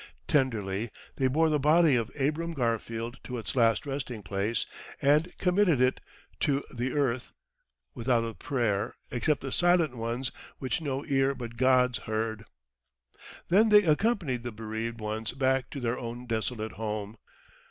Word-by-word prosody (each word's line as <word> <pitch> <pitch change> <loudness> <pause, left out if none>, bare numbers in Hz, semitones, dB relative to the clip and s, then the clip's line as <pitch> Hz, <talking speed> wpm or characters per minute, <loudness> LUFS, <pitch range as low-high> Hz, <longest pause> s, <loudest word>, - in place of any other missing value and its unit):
Tenderly 115 -6 +1 0.3
they 130 - +3
bore 160 +5 +3
the 150 - +2
body 155 0 +5
of 115 -1 0
Abram 160 +4 0
Garfield 115 -1 -2
to 125 - -5
its 115 - -5
last 115 +2 +3
resting 135 -6 -4
place 100 +3 -1 0.3
and 150 +5 +3
committed 180 -5 +3
it 130 0 +2 0.4
to 140 -1 +1
the 125 +1 -2
earth, 130 -4 0 0.6
without 120 -1 +1
a 115 0 -4
prayer 110 -1 -1 0.2
except 125 +5 +1
the 135 - -5
silent 175 -5 +3
ones 120 +2 -2 0.3
which 130 +3 -2
no 140 -2 -3
ear 135 -1 +2
but 120 -2 -7
God's 125 0 +3
heard. 110 0 -3 1.0
Then 210 +6 +5
they 210 -1 +7
accompanied 165 - +1
the 120 0 -5
bereaved 110 +1 -4
ones 110 +1 -3
back 130 0 +1
to 140 - -6
their 120 -1 -1
own 120 +1 -6
desolate 110 -1 -2
home. 105 0 -4
125 Hz, 150 wpm, -29 LUFS, 115-145 Hz, 1.0 s, they